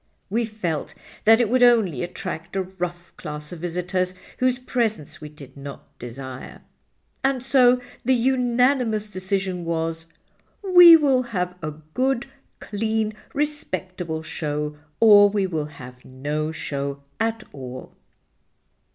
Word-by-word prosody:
We 230 +2 +1
felt 170 -9 -4 0.3
that 225 +1 +7
it 240 - +3
would 250 +3 +2
only 220 - +4
attract 175 -1 -5
a 190 - +1
rough 175 -2 -6
class 150 -1 -6
of 175 - -7
visitors, 180 +2 -2 0.2
whose 255 -1 +2
presence 230 - -2
we 150 - -7
did 140 -3 -14
not 140 0 -10
desire. 130 +2 -8 0.6
And 265 -2 +1
so 250 -2 +5 0.2
the 260 +2 +3
unanimous 245 -2 +2
decision 185 -1 -2
was, 165 0 -2 0.6
'We 355 -3 +10
will 280 -5 +3 0.2
have 180 0 -1
a 155 -2 -4 0.2
good, 260 -1 +1 0.3
clean, 220 +1 -1 0.2
respectable 185 - -3
show 150 -1 -3 0.2
or 205 -2 +8
we 200 -1 0
will 160 -5 -2
have 125 -4 -12
no 150 +4 -3
show 140 -2 -4 0.2
at 225 -1 -1
all. 130 -2 -9
185 Hz, 125 wpm, -23 LUFS, 155-235 Hz, 0.6 s, We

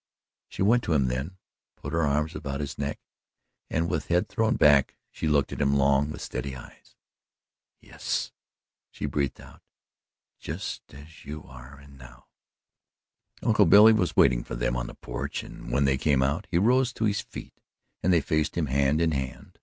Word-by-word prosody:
She - - -3
went 120 +5 +4
to 85 - 0
him 70 -4 +2
then, 70 +9 -4 0.4
put - - -8
her 85 - +1
arms 75 +2 0
about 70 -5 -4
his 70 -1 -5
neck, 70 +1 -3 0.7
and 85 +1 0
with 80 -3 -2
head 90 +1 +1
thrown 110 +2 +1
back 70 -2 +4
she 80 - -3
looked 75 -2 +2
at - - -4
him 70 0 +2
long 70 +1 +3
with 75 - -7
steady 70 -2 -5
eyes. 60 - -14 0.9
"Yes," - - -3 0.6
she - - -6
breathed 70 -1 -2
out - - -15 0.8
"just - - -6
as 75 +4 -14
you 75 +1 -7
are 65 +2 -13
and 70 -1 -16
now." 60 -1 -15 1.2
Uncle 105 -4 +4
Billy 105 +5 +8
was 95 -5 0
waiting - - +4
for - - -6
them - - -1
on - - -3
the - - -10
porch - - -5
and - - -10
when 70 +3 +2
they 65 -1 +1
came 70 -3 +2
out, 75 +10 -1
he 85 - +1
rose 125 +6 +3
to 110 - -1
his 105 -1 0
feet - - -10 0.5
and 90 - +2
they 85 -3 +4
faced 75 +3 -1
him, 85 - +1
hand 70 +3 +1
in 80 -1 +2
hand. 65 -3 -5
75 Hz, 185 wpm, -26 LUFS, 70-85 Hz, 1.2 s, Billy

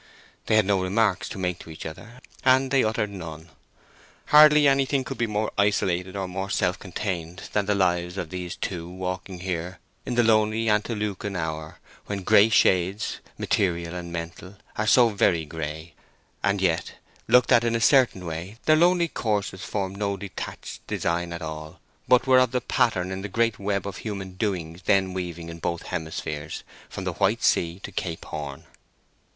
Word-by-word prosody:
They 110 - +3
had 110 -2 +5
no 100 -1 +2
remarks 95 +1 +1
to - - -7
make 90 -2 -2
to - - -12
each 80 - -9
other, 115 +10 -9 0.2
and 130 0 +4
they 135 -1 +4
uttered 110 -1 0
none. 80 -3 -8 0.8
Hardly 150 -1 +8
anything 135 0 +2
could - - -7
be 120 - +1
more 105 0 -1
isolated 95 -2 +1
or 95 -1 -2
more 95 +2 -4
self 95 -1 0
contained 90 -2 -4
than 105 -1 +1
the 105 - +2
lives 90 -1 +1
of 85 -4 -4
these 90 -1 -5
two 85 -2 -4
walking 90 0 -5
here 90 -1 -3 0.3
in 125 - -3
the 120 - +4
lonely 110 0 +3
antelucan 105 -2 -1
hour, 80 -2 -4 0.3
when 100 -2 -4
gray 110 +2 +6
shades, 95 -1 +2 0.2
material 85 -3 0
and 90 -1 -6
mental, 85 +3 -7 0.2
are 110 - -1
so 120 +1 +6
very 90 -6 +2
gray. 80 +1 -6 0.5
And 100 -1 +1
yet, 85 -2 0 0.3
looked 125 0 +5
at 120 -2 +6
in 115 0 +1
a - - +1
certain 120 -6 +4
way, 85 +6 -6
their 155 - +6
lonely 175 +1 +4
courses 105 - -2
formed 100 -1 -3
no 100 -1 -1
detached 95 0 -7
design 85 0 -1
at 85 0 -5
all, 80 +2 -7 0.3
but 125 -1 +5
were 130 -1 +5
part 130 - +4
of - - -21
the 125 - +1
pattern 95 -6 +1
in 95 0 -4
the 100 - -5
great 115 +1 +1
web 100 -1 -1
of 100 -2 -5
human 100 -3 -5
doings 90 -4 -3
then 95 -2 +3
weaving 85 -2 -5
in 85 0 -8
both 85 +1 -3
hemispheres, 80 -1 -5 0.3
from - - -6
the - - -2
White - - +1
Sea 85 +2 +2
to - - -6
Cape 85 -3 -4
Horn. 75 -3 -6
95 Hz, 180 wpm, -25 LUFS, 85-110 Hz, 0.8 s, Hardly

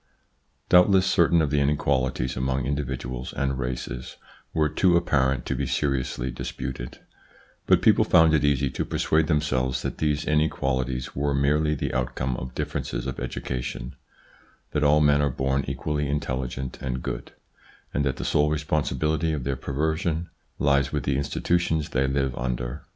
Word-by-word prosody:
Doubtless 90 +1 +6
certain 85 -2 +4
of 70 - -1
the 75 - +2
inequalities 65 -3 0
among 65 0 -1
indi 70 +2 0
viduals 65 -1 -5
and 70 -1 -1
races 65 0 -5 0.3
were 80 -1 +2
too 85 +3 +3
apparent 70 -6 +1
to - - -1
be - - -2
seriously 65 -3 -1
disputed; 60 0 -6 0.7
but - - +4
people - - +5
found 80 -1 +5
it 75 - +3
easy 70 -2 +2
to - - -2
persuade 80 0 +1
them 75 -2 +2
selves 65 -3 -1
that - - -4
these 75 -1 0
inequalities 65 -4 0
were 70 0 0
merely 75 +2 +2
the - - -3
outcome 65 0 -1
of 65 0 -7
differences - - -3
of 65 - -4
education, 60 0 -4 0.8
that 75 - 0
all 75 +1 +5
men 75 -1 +4
are 70 - +2
born 65 +1 0
equally 75 -1 -2
intelligent 65 -2 -3
and 65 -1 -3
good, - - -5 0.6
and 70 - +1
that 65 -2 0
the - - -5
sole 75 0 +2
respon 75 0 0
sibility 80 +2 0
for 75 - -1
their 70 +1 -1
perversion 80 +5 -2 0.3
lies 70 0 +2
with 75 - -2
the 70 - 0
institutions 80 +3 0
they 65 +1 +1
live 65 -2 0
under. 60 +2 -3
70 Hz, 160 wpm, -25 LUFS, 65-75 Hz, 0.8 s, Doubtless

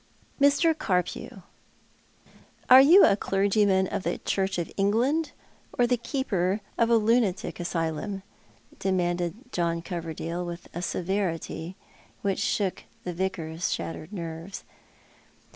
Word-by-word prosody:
"Mr. 285 +4 +5
Carpew, 185 - -2 1.3
are 260 +1 +11
you 335 +9 +8
a - - +4
clergyman 195 -1 +2
of 190 - -3
the 175 -1 -2
Church 190 -1 -1
of 170 - -3
England 240 +11 +1 0.5
or 245 - +4
the 245 +1 +2
keeper 210 -7 -1 0.2
of 230 -1 +2
a 235 - +5
lunatic 220 -5 +1
asylum? 170 +3 -3 0.3
" - - -27
demanded 175 -2 0 0.2
John 170 -1 -1
Coverdale, 170 0 -4
■with 175 0 -6
a 175 - -4
severity 180 -2 -2 0.5
which 195 -1 0
shook 195 -3 -1 0.2
the 180 - -4
Vicar's 170 -2 -2
shattered 165 +1 -4
nerves. 170 0 -6
190 Hz, 120 wpm, -27 LUFS, 170-215 Hz, 1.3 s, are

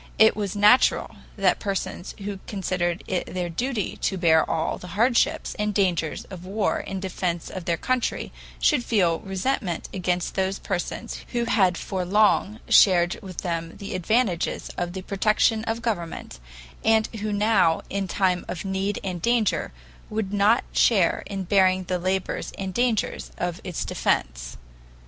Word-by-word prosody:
It 220 0 +6
was 205 -1 -3
natural 210 +5 +4 0.2
that 195 -3 +2
persons 195 -2 -4
who 200 -1 -4
considered 185 -3 -2
it 185 -2 -2
their 180 -1 -2
duty 235 +4 -2
to 190 - -1
bear 160 -3 +4
all 165 0 -1
the 180 +2 -9
hardships 235 +2 +2
and 210 -1 -1
dangers 175 -6 0
of 180 -2 -8
war 200 +3 0
in 195 - -5
defense 180 -2 -3
of 185 -3 -6
their 170 -2 0
country 255 +3 -1 0.3
should 295 -6 +3
feel 180 -9 +2
resentment 195 -2 -2
against 180 -2 -1
those 190 0 0
persons 180 -3 -4
who 240 -1 0
had 195 -6 +3
for 190 -2 -3
long 210 +2 +2
shared 175 -3 +5
with 185 -3 -9
them 165 -1 -3
the 200 - -6
advantages 185 0 0
of 175 0 -3
the 190 0 -6
protection 215 +3 +2
of 230 +1 -3
government, 170 - -4 0.4
and 220 0 +4
who 215 0 -3
now 205 -5 +3
in 195 -1 -2
time 185 -1 +1
of 180 - -5
need 195 +1 -1
and 180 -3 -4
danger 235 0 +1 0.4
would 210 -2 -3
not 205 +4 +4
share 195 -8 +3
in 195 -2 -4
bearing 185 0 +3
the 180 0 -2
labors 185 +1 -2
and 190 -1 -4
dangers 240 -2 0
of 175 0 -3
its 180 -4 -4
defense. - - -1
190 Hz, 155 wpm, -25 LUFS, 175-210 Hz, 0.4 s, It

